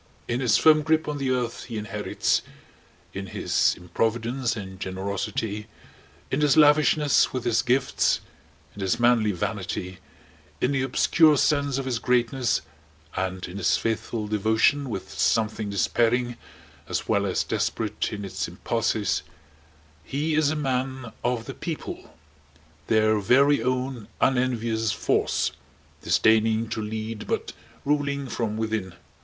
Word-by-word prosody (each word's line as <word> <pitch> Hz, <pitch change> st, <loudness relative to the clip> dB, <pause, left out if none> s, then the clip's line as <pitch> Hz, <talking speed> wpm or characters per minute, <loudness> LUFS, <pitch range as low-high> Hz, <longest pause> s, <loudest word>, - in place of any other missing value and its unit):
In 120 Hz, +1 st, -1 dB
his 125 Hz, -5 st, +3 dB
firm 155 Hz, -1 st, +6 dB
grip 160 Hz, +1 st, +1 dB
on 150 Hz, -1 st, -3 dB
the 135 Hz, -1 st, -1 dB
earth 125 Hz, -2 st, -2 dB
he 115 Hz, -3 st, -6 dB
inherits, 105 Hz, 0 st, -1 dB, 0.7 s
in 95 Hz, 0 st, -5 dB
his -, -, +1 dB
improvidence 115 Hz, +7 st, -1 dB
and 95 Hz, -3 st, -8 dB
generosity, 100 Hz, +3 st, -3 dB, 0.6 s
in 135 Hz, -, 0 dB
his 150 Hz, 0 st, +4 dB
lavishness 150 Hz, -1 st, +5 dB
with 130 Hz, -2 st, -3 dB
his 115 Hz, -2 st, +2 dB
gifts, 130 Hz, +3 st, +2 dB, 0.5 s
in 100 Hz, -, -9 dB
his 95 Hz, +4 st, 0 dB
manly 120 Hz, -3 st, +4 dB
vanity, 95 Hz, -1 st, -4 dB, 0.6 s
in 125 Hz, -, +1 dB
the 135 Hz, -2 st, +1 dB
obscure 150 Hz, +4 st, +4 dB
sense 140 Hz, -2 st, +2 dB
of 135 Hz, -, -3 dB
his 125 Hz, -3 st, -1 dB
greatness 125 Hz, +1 st, +1 dB, 0.5 s
and 95 Hz, 0 st, -3 dB
in 90 Hz, -, -8 dB
his 100 Hz, -, +2 dB
faithful 115 Hz, -1 st, -2 dB
devotion 110 Hz, +7 st, +2 dB
with 100 Hz, -4 st, -5 dB
something 110 Hz, -1 st, 0 dB
despairing 120 Hz, +4 st, +1 dB, 0.5 s
as -, -, -2 dB
well 100 Hz, -2 st, +1 dB
as 95 Hz, -, 0 dB
desperate 105 Hz, -2 st, -2 dB
in 105 Hz, -1 st, -5 dB
its 95 Hz, -1 st, -3 dB
impulses, 100 Hz, +2 st, -1 dB, 0.8 s
he 150 Hz, +4 st, -2 dB
is 155 Hz, -1 st, +3 dB
a 155 Hz, -, -1 dB
Man 130 Hz, -3 st, -2 dB
of 120 Hz, -2 st, -1 dB
the 135 Hz, -, -6 dB
People, 160 Hz, +2 st, -7 dB, 0.7 s
their 110 Hz, -1 st, +3 dB
very 135 Hz, +7 st, +4 dB
own 125 Hz, -1 st, -2 dB
unenvious 115 Hz, -4 st, +1 dB
force, -, -, 0 dB, 0.5 s
disdaining 110 Hz, +1 st, +3 dB
to 110 Hz, 0 st, -3 dB
lead 110 Hz, 0 st, -5 dB
but -, -, -2 dB, 0.3 s
ruling 140 Hz, -1 st, 0 dB
from 110 Hz, -3 st, -2 dB
within. 110 Hz, -5 st, -2 dB
115 Hz, 135 wpm, -25 LUFS, 105-135 Hz, 0.8 s, firm